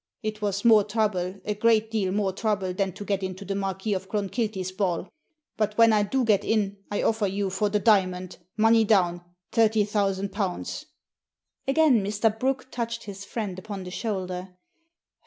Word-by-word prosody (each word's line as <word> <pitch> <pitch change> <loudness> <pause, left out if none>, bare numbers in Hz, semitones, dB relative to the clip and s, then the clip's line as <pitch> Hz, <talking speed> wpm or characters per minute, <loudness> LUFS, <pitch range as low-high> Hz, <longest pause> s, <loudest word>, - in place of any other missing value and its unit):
It 215 0 -4
was 200 +1 -1
more 220 -3 +7
trouble, 200 -3 -1
a 210 - 0
great 220 +1 +2
deal 200 -4 0
more 195 -1 0
trouble, 200 -3 -1
than 195 0 -1
to 205 - -8
get 200 -1 -1
into 190 +1 -5
the 200 - -2
Marquis 195 +1 -2
of 190 0 -4
Clonkilty's 205 -2 -2
ball. 185 -2 -1 0.5
But 215 -1 -1
when 230 -1 +6
I 210 - +4
do 250 +5 0
get 205 -3 +3
in 205 -2 0
I 205 - -1
offer 220 -2 +1
you 195 0 -2
for 205 +2 0
the 210 - +1
diamond, 185 -4 +1 0.2
money 225 +1 +5
down, 180 -5 +2 0.3
thirty 220 -1 +3
thousand 200 -1 0
pounds." 190 -4 -3 0.8
Again 270 -6 +4
Mr. 210 +2 +1
Brooke 260 0 -1
touched 235 -1 -3
his 200 -1 -8
friend 200 -4 -4
upon 200 -1 -6
the 180 - -8
shoulder. 185 -2 -4
205 Hz, 175 wpm, -26 LUFS, 190-220 Hz, 0.8 s, more